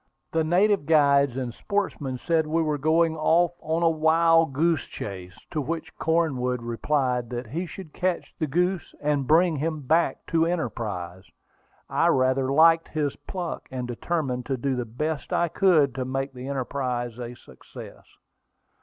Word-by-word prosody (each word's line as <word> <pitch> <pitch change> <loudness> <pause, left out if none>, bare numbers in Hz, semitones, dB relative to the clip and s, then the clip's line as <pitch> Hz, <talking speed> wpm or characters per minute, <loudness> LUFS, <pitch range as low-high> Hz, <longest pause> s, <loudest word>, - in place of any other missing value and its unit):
The 160 0 +1
native 185 +1 +2
guides 140 -4 +4
and 125 -3 -3
sportsmen 155 - -2
said 160 +3 0
we 165 +2 +1
were 150 -2 -1
going 160 +2 +2
off 165 +2 +3
on 160 +1 -1
a 165 - +5
"wild 165 0 +3
goose 160 0 +1
chase"; 90 -2 -8
to 155 - -1
which 160 +4 -5
Cornwood 130 -7 0
replied 125 0 -1
that 125 0 -4
he 165 +11 -4
should 165 -1 -10
catch 185 -1 -2
the 155 - 0
goose 180 +4 -1
and 145 -2 0
bring 165 +1 +4
him 155 +1 -2
back 160 +5 +1
to 165 0 +3
Enterprise. 105 - -4 0.6
I - - +2
rather 130 0 +2
liked 165 +3 +5
his 150 -3 -2
pluck, 180 -3 -6
and 125 -1 -4
determined 125 0 -2
to 135 -1 -1
do 135 +2 -1
the 125 -1 -2
best 150 +7 -4
I 175 - +1
could 160 -7 +3
to 130 0 -3
make 135 +1 -3
the 125 +1 -8
enterprise 125 -3 -3
a 120 0 -6
success. 65 - -13
150 Hz, 160 wpm, -25 LUFS, 125-165 Hz, 0.6 s, a